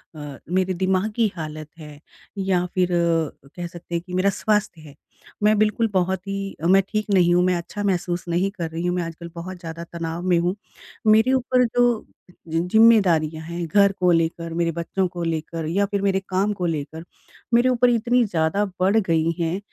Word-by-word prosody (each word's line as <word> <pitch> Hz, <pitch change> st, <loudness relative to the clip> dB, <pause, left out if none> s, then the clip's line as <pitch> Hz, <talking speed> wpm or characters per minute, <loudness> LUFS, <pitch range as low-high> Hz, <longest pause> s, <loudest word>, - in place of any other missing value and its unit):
अ, 145 Hz, -2 st, -8 dB
मेरे 185 Hz, +1 st, +1 dB
दिमागी 190 Hz, +4 st, 0 dB
हालत 155 Hz, -2 st, -6 dB
है 150 Hz, -2 st, -11 dB, 0.4 s
या 190 Hz, -2 st, +1 dB
फिर 180 Hz, -1 st, +2 dB, 0.7 s
कह 175 Hz, -1 st, -5 dB
सकते 170 Hz, 0 st, -8 dB
हैं 170 Hz, -, -1 dB
कि 180 Hz, -, -10 dB
मेरा 185 Hz, +2 st, +2 dB
स्वास्थ्य 210 Hz, -3 st, -1 dB
है, 150 Hz, -2 st, -14 dB, 0.5 s
मैं 215 Hz, 0 st, +4 dB
बिल्कुल 215 Hz, +2 st, +2 dB
बहुत 190 Hz, +1 st, 0 dB
ही 195 Hz, 0 st, -4 dB
मैं 190 Hz, +3 st, +6 dB
ठीक 215 Hz, 0 st, -1 dB
नहीं 175 Hz, -2 st, +4 dB
हूँ, 180 Hz, 0 st, +4 dB
मैं 180 Hz, 0 st, +2 dB
अच्छा 175 Hz, +4 st, -5 dB
महसूस 180 Hz, -2 st, -1 dB
नहीं 180 Hz, +3 st, +1 dB
कर 170 Hz, -5 st, -5 dB
रही 165 Hz, +2 st, -4 dB
हूँ, 180 Hz, 0 st, 0 dB
मैं 180 Hz, -, -1 dB
आजकल 165 Hz, +1 st, -8 dB
बहुत 180 Hz, +2 st, -7 dB
ज़्यादा 165 Hz, -1 st, -7 dB
तनाव 170 Hz, 0 st, -5 dB
में 175 Hz, -, +4 dB
हूँ। 175 Hz, +2 st, 0 dB, 0.5 s
मेरे 220 Hz, +4 st, +5 dB
ऊपर 255 Hz, -1 st, +2 dB
जो 240 Hz, -1 st, +1 dB, 0.4 s
जि 165 Hz, 0 st, -1 dB
जिम्मेदारियाँ 180 Hz, -6 st, +4 dB
हैं 170 Hz, +1 st, -4 dB
घर 200 Hz, +4 st, +4 dB
को 185 Hz, -2 st, +1 dB
लेकर, 165 Hz, 0 st, 0 dB
मेरे 170 Hz, 0 st, 0 dB
बच्चों 170 Hz, +3 st, -2 dB
को 175 Hz, -1 st, -6 dB
लेकर 165 Hz, 0 st, -3 dB
या 195 Hz, +5 st, +1 dB
फिर 200 Hz, 0 st, -2 dB
मेरे 195 Hz, -1 st, +1 dB
काम 195 Hz, +3 st, +1 dB
को 185 Hz, -3 st, -3 dB
लेकर 160 Hz, -1 st, -4 dB, 0.5 s
मेरे 240 Hz, +2 st, +5 dB
ऊपर 250 Hz, 0 st, +3 dB
इतनी 240 Hz, +1 st, +2 dB
ज़्यादा 175 Hz, +1 st, 0 dB
बढ़ 190 Hz, +4 st, +3 dB
गई 165 Hz, -5 st, +1 dB
हैं 170 Hz, +3 st, -1 dB
180 Hz, 190 wpm, -23 LUFS, 165-200 Hz, 0.7 s, मैं